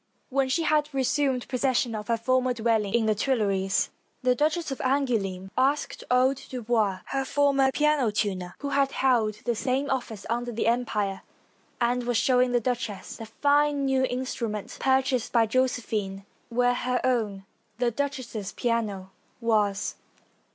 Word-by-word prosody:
When 270 -1 +1
she 330 +5 +1
had 300 -1 +2
resumed 265 -1 +1
possession 255 -2 +1
of 210 -1 -5
her 230 -1 +1
former 255 +2 +1
dwell 225 -1 +2
ing 200 - -2
in 235 -2 +2
the 215 - +3
Tuileries, 200 -5 0 0.3
the 250 0 +4
Duchess 310 +4 0
of 270 - -4
Angouleme 220 -9 0
asked 275 +3 0
old 255 +2 +3
Dubois, 220 -6 0
her 270 0 0
former 275 -1 +2
piano 300 -4 +2
tuner, 190 -4 -2
who 280 - -2
had 275 -1 +1
held 235 -5 +2
the 240 - +1
same 270 +4 -1
office 230 -6 -3
under 240 +1 -2
the 230 - -2
Empire 215 -5 0 0.6
and 245 +1 +1
was 245 -1 +1
showing 250 +1 +3
the 245 - +3
duch 245 -1 -1
ess 200 -2 -8
the 225 -1 -8
jBjie 290 +1 +4
new 270 -2 +1
instrument 245 -5 -3
purchased 265 -2 +1
by 230 -2 +4
Josephine, 220 -5 -1 0.2
where 245 +1 +2
her 250 0 -1
own, 215 -6 0 0.3
the 240 0 +1
duchess's 235 -6 -4
piano, 210 -6 -2 0.3
was. 210 -4 0
245 Hz, 155 wpm, -26 LUFS, 215-265 Hz, 0.6 s, the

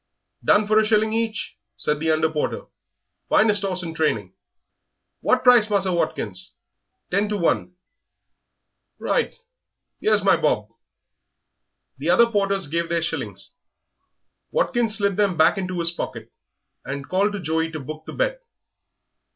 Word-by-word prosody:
"Done 210 - +4
for 215 +1 +4
a - - +3
shilling 215 0 +2
each," 225 -3 -2 0.2
said 150 0 -1
the 160 +1 -1
under 160 0 +3
porter; 150 -1 -2 0.7
"finest 210 -2 +3
'orse 185 -2 -2
in 165 -1 -5
training.... 110 - -1 0.9
What 255 - +1
price, 245 -4 +6
Musser 195 -2 +1
Watkins?" 100 - -3 0.6
"Ten 200 +3 +1
to 210 - -1
one." 180 0 0 1.2
"Right, 485 - -1 0.7
'ere's 215 -2 +3
my 195 - +4
bob." 130 -9 0 1.3
The 150 +5 -2
other 185 +7 +6
porters 200 -4 0
gave 170 +3 -2
their 170 -1 0
shillings; - - -4 1.0
Watkins 240 - +2
slid 200 -2 0
them 200 -4 +1
back 165 +5 +4
into 185 -1 -4
his 170 0 +1
pocket, 115 -9 -6 0.5
and 140 +1 -6
called 200 +3 +1
to 205 - -4
Joey 160 -1 -1
to 155 - -5
book 155 +3 -8
the - - -7
bet. - - -1
185 Hz, 140 wpm, -23 LUFS, 160-210 Hz, 1.3 s, price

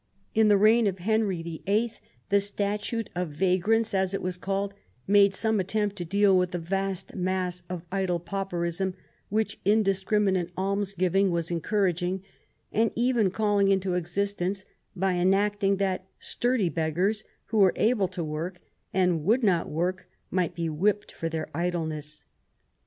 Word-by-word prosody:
In 220 0 +4
the 205 -1 +6
reign 215 +2 +5
of 190 -1 -1
Henry 200 -2 0
the 165 -1 -7
Eighth 220 +3 0 0.3
the 200 0 +4
Statute 205 +2 -2
of 180 -1 -2
Vagrants, 190 +7 +1
as 190 0 +1
it - - -3
was 180 0 -2
called, 195 +2 -2 0.3
made 200 0 +5
some 220 +1 +1
attempt 205 +2 0
to 175 - -4
deal 200 +2 +4
with 180 -1 +2
the 180 - -3
vast 195 +2 -3
mass 180 -1 -2
of 180 -2 -5
idle 190 -3 0
pauperism, 180 0 -2 0.3
which 215 0 -1
indiscriminate 195 -2 +2
alms 200 +1 -1
giving 185 +2 +2
was 170 -1 -1
encouraging 180 +1 0 0.5
and 225 +1 +2
even 235 -4 +2
calling 205 0 +2
into 190 -2 +1
ex 175 -1 -3
istence, 200 -1 -1 0.3
by 190 0 +1
enacting 195 +2 +2
that 190 -1 -1
sturdy 240 -7 0
beggars 175 +8 0 0.3
who 220 - +1
were 190 -3 +6
able 215 -4 +2
to 180 -2 -5
work 160 +4 -4 0.3
and 180 -4 +1
would 230 +9 +2
not 180 -6 +2
work 180 +4 -2 0.2
might 180 -3 0
be 170 -1 -2
whipped 200 +7 0
for 165 - -4
their 160 -1 -3
idleness. 160 -3 -3
190 Hz, 155 wpm, -27 LUFS, 175-205 Hz, 0.5 s, the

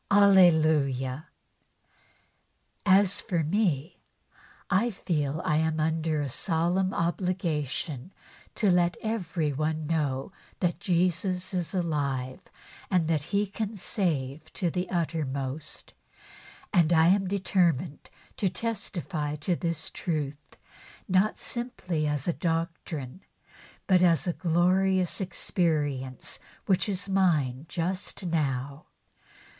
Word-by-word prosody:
Hallelujah 155 -8 +4 1.6
I 190 0 +8
As 200 0 0
for 170 -3 -1
me, 170 -2 0 0.7
I 200 +5 +2
feel 155 -6 -2
I 150 - +2
am 160 0 +1
under 160 -1 0
a - - -2
solemn 175 +6 +1
obligation 170 -5 -2 0.4
to 205 -4 +3
let 175 0 +2
everybody 160 -8 -1
know 150 -2 -1 0.3
that 175 -2 0
Jesus 180 +1 0
is 180 +1 -2
alive 140 -7 -1 0.5
and 180 -5 +2
that 155 -3 +1
He 205 +1 +1
can 210 +1 -4
save 155 - -2
to 175 -4 -1
the 180 +2 -2
uttermost, 150 -4 -3 0.8
and 170 -4 +4
I 165 0 +6
am 195 0 +3
determined 180 -7 0 0.3
to 195 - +1
testify 175 -7 -3
to 155 +4 -1
this 165 -2 -3
truth 150 -4 -4 0.5
not 190 +2 +2
simply 185 -11 -3
as 145 0 -1
a 175 - +2
doctrine, 165 -3 -3 0.6
but 185 -2 +4
as 170 -3 +4
a 175 - 0
glorious 185 +2 +2
experience 150 -7 -1 0.3
which 195 +1 +2
is 185 -1 -2
mine 160 -8 +1
just 185 +3 -2
now. 140 -4 -2
170 Hz, 105 wpm, -28 LUFS, 150-185 Hz, 1.6 s, I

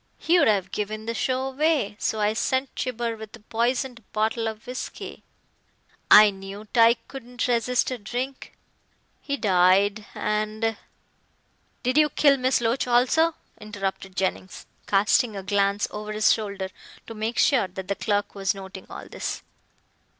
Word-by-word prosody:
He 350 +2 +3
would - - +4
have 195 -3 +1
given 215 +1 -4
the 230 - -2
show 260 +3 -1
away, 280 -6 +1
so 220 - -1
I 210 0 +2
sent 260 +4 -1
Gibber 235 -2 -3
with 220 0 -10
a - - -15
poisoned 235 +2 -2
bottle 220 +1 0
of 220 -1 -6
whisky. 250 +1 -7 0.9
I 210 0 +9
knew 195 +2 -9
Tyke 230 0 +4
couldn't 250 -3 -5
resist 245 +1 +1
a 255 - -4
drink. 250 +5 -5 0.7
He 280 0 -3
died, 200 +1 +3
and 215 +1 -1 0.5
" - - -42
"Did 255 +4 +3
you 305 -1 +5
kill 285 -2 +4
Miss 255 -1 +1
Loach 235 +3 0
also?" 265 +7 +3 0.2
interrupted 195 -2 -5
Jennings, 190 0 -3 0.2
casting 210 +3 +3
a 195 - -5
glance 200 +1 +1
over 210 0 -6
his 215 0 +4
shoulder 200 -3 -4 0.4
to 225 - -8
make 220 +2 -3
sure 255 -9 +3
that 185 +1 -8
the 200 - 0
clerk 205 0 -1
was 195 -1 -1
noting 190 -1 -9
all - - -8
this. - - -5
220 Hz, 155 wpm, -25 LUFS, 205-250 Hz, 0.9 s, I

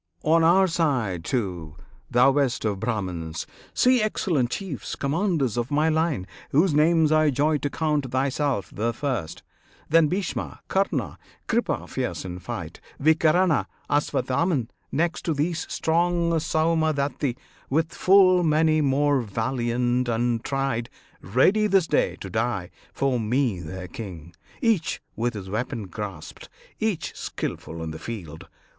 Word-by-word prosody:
On 165 +1 +4
our 180 +4 +6
side, 130 - 0
too, 90 - -3 0.3
thou 125 +2 +5
best 135 -4 0
of 100 -3 -1
Brahmans! 90 -8 -3 0.3
see 255 -1 +4
Excellent 170 - 0
chiefs, 175 - -5
commanders 145 - 0
of 120 0 -1
my 150 +2 +2
line, 160 - 0 0.2
Whose 160 +4 +3
names 155 +1 +4
I 155 -1 +4
joy 145 +3 +1
to 145 - -2
count: 150 -3 -1
thyself 135 -3 -1
the 115 +2 -1
first, 120 - -3 0.5
Then 165 0 +5
Bhishma, 185 +3 -3
Karna, 175 - 0 0.3
Kripa - - 0
fierce - - -3
in 90 -1 -6
fight, - - -7 0.2
Vikarna, 160 +2 +3 0.2
Aswatthaman; 140 -1 +1 0.2
next 170 +4 0
to 160 - 0
these 165 +3 -2
Strong 170 +1 +1
Saumadatti, 155 -5 0 0.3
with 160 +4 0
full 185 -1 +5
many 155 -1 +3
more 140 0 +2
Valiant 120 +2 -1
and 115 0 0
tried, 135 -4 -1 0.3
ready 190 - +3
this 195 -4 +3
day - - +1
to 95 - -6
die 110 -5 -1 0.2
For 135 -3 0
me 115 -2 0
their 90 +3 -7
king, 85 -4 -8 0.3
each 210 -8 +1 0.2
with 120 0 -1
his 95 -2 -6
weapon 110 +2 -3
grasped, 100 +1 -7 0.3
Each 195 -9 -2
skilful 80 0 -5
in 80 - -4
the 80 - -7
field. 85 -9 -7
140 Hz, 135 wpm, -25 LUFS, 115-160 Hz, 0.5 s, our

